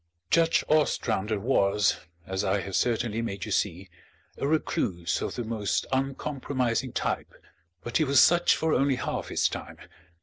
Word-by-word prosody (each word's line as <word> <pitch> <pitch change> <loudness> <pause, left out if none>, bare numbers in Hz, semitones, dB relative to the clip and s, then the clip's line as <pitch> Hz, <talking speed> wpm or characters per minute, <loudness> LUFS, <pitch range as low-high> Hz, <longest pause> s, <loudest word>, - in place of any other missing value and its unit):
Judge 165 0 +3
Ostrander 110 -9 +1
was, 105 -4 +2 0.3
as 95 +1 -2
I 100 0 +1
have 95 -1 -5
certainly 115 -1 0
made 100 -4 -4
you - - -6
see, 95 -1 -1 0.5
a 140 - 0
recluse 105 - -1
of - - -3
the 120 - -3
most 110 -3 -1
uncompromising 130 -2 -1
type; - - -3 0.5
but 120 - -1
he 160 - +3
was 140 -2 +4
such 175 0 +5
for 160 0 0
only 140 -1 +2
half - - -3
his - - +1
time. - - -7
120 Hz, 155 wpm, -27 LUFS, 100-140 Hz, 0.5 s, such